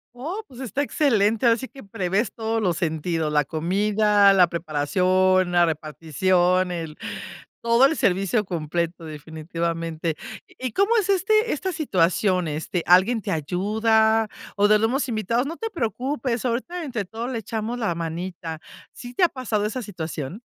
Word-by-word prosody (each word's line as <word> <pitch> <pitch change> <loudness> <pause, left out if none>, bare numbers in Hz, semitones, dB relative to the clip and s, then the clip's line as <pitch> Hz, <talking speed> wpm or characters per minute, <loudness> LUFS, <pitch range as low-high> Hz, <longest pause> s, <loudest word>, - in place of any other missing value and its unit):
Oh, 330 - -5
pues 250 - -14
está 260 +3 -2
excelente. 225 -7 +2
Ahora 230 -1 +5
sí 260 +2 -6
que 270 - -13
prevés 195 +2 -1
todos 225 0 -2
los 175 -5 0
sentidos, 160 -2 -1
la 150 -1 +2
comida, 200 +6 +3
la 180 -2 +6
preparación, 180 +4 +1
la 175 -1 +4
repartición, 175 +4 +1
el 165 -3 -5 0.6
todo 235 +3 +5
el 320 - +2
servicio 195 +4 +1
completo, 170 0 -3
definitivamente, 165 +1 -4 0.3
¿y 255 -1 -6
cómo 400 - +2
es 405 -3 0
este 430 +4 +2
esta 370 +5 -2
situación? 185 - +1
¿Este, 160 +3 -3
alguien 190 +6 +5
te 200 -1 -4
ayuda, 220 +7 +2 0.3
o 205 0 +4
de 215 0 +5
los 225 - +3
mismos 270 +2 -1
invitados: 230 +2 0
"No 330 - -6
te 450 - -3
preocupes, 255 - -2
ahorita 260 +9 -2
entre 235 -7 -3
todos 230 +5 -5
le 230 - -2
echamos 225 +2 -4
la 215 -7 0
manita". 165 0 -5 0.3
¿Sí 245 0 -10
te 355 - +1
ha - - +8
pasado 220 -5 -2
esa 245 +4 -3
situación? 165 - -6
200 Hz, 160 wpm, -24 LUFS, 170-240 Hz, 0.6 s, ha